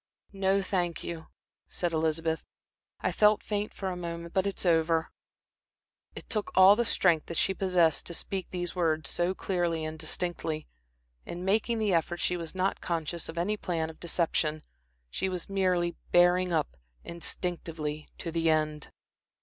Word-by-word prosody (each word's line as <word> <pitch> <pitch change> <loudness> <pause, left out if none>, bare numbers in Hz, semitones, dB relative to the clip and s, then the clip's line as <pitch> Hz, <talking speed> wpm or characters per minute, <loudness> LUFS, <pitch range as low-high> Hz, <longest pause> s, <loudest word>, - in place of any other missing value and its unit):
"No, 195 0 +2
thank 175 -3 -1
you," 165 -1 -6 0.4
said 175 -2 -2
Elizabeth. 160 0 0 0.6
"I - - +1
felt 210 0 +4
faint 210 0 -2
for 195 - -4
a - - -4
moment, 170 -1 -6
but 190 0 +2
it 200 - -3
is - - -2
over." 165 -1 +3 1.0
It - - -9
took 215 -2 -2
all 190 +2 +9
the 235 +2 +1
strength 170 -7 +3
that 170 - -4
she 190 - +2
possessed 180 -5 +2
to 170 - -4
speak 190 +1 -4
these 175 -1 -4
words 160 -3 +1
so 175 +2 0
clearly 170 -5 -1
and 155 0 -5
distinctly. 160 -1 -3 0.6
In 175 +1 -6
making 220 +4 +2
the 215 -3 +1
effort 170 +1 +1
she 180 - +1
was 170 0 -6
not 190 +1 0
conscious 170 0 -3
of 165 - -7
any 205 +5 0
plan 165 -5 -2
of 160 - -19
deception. 160 -3 0 0.5
She 190 - -1
was 180 -2 -4
merely 180 -3 +1 0.2
bearing 175 +1 +5
up, 60 - 0 0.3
instinctively, 165 -3 -4
to 165 - -4
the 165 0 +1
end. 155 -1 0
175 Hz, 165 wpm, -29 LUFS, 160-185 Hz, 1.0 s, all